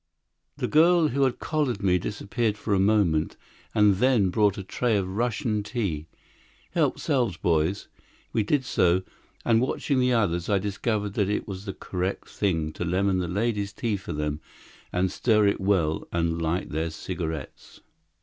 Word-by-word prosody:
The - - -1
girl 165 +1 +5
who 135 +2 +2
had 130 -2 0
collared 140 -10 -1
me 90 -2 +3
disappeared 105 +3 -2
for 105 - -2
a 95 - +3
moment, 95 -6 +2 0.4
and 105 -2 +5
then 120 -4 +3
brought 105 -1 +2
a 100 - -4
tray 110 +3 0
of 95 -2 -1
Russian 110 +2 -1
tea. 100 -8 -3 0.6
"Help - - +1
'selves, 125 - 0
boys!" 85 +4 0 0.5
We 115 - +2
did 130 +5 +1
so, 90 -4 +2 0.4
and, 115 -1 +4
watching 135 +1 0
the 125 0 +3
others, 90 -7 +1
I 100 - +3
discovered 105 +1 -2
that 100 -2 0
it 105 - -1
was 95 0 -6
the 95 - -4
correct 90 +1 -4
thing 80 -6 -1
to - - -4
lemon 95 +2 +1
the 90 - -1
ladies' 100 +1 -1
tea 110 -1 -1
for 100 - -7
them 75 0 -2 0.5
and 90 0 0
stir 110 -3 +3
it 100 - +1
well 90 -6 +1
and 85 -1 0
light 80 +3 -1
their 80 +2 -1
cigarettes. 80 -3 -6
100 Hz, 170 wpm, -26 LUFS, 90-115 Hz, 0.6 s, girl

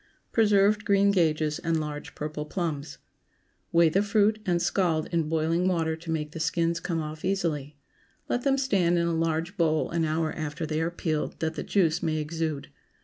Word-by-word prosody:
PRESERVED 210 -1 +3
GREEN 200 -2 +4
GAGES 155 -5 +1
AND 165 -1 0
LARGE 150 -1 -6
PURPLE 150 0 -4
PLUMS. 155 -5 -3
✠ - - -26 0.7
Weigh 170 0 +5
the 190 +5 +2
fruit 210 +1 +2
and 175 -1 +2
scald 170 -4 +1
in 165 -3 0
boiling 165 +3 +1
water 165 -3 +1
to 165 +1 -11
make 150 -2 -2
the 165 - -7
skins 165 +1 0
come 165 -2 -2
off 155 0 -6
easily. 155 -7 -1 0.5
Let 245 - 0
them 275 +1 +2
stand 190 -10 +2
in 170 - +2
a 170 - 0
large 165 +3 -1
bowl 160 -3 +1
an 170 -1 0
hour 160 0 0
after 155 +1 -4
they 155 +1 -1
are 165 - 0
peeled, 160 -3 -3
that 160 0 -1
the - - -4
juice 170 -6 +1
may 155 -1 0
exude. 155 -2 -3
165 Hz, 190 wpm, -27 LUFS, 155-180 Hz, 0.7 s, Weigh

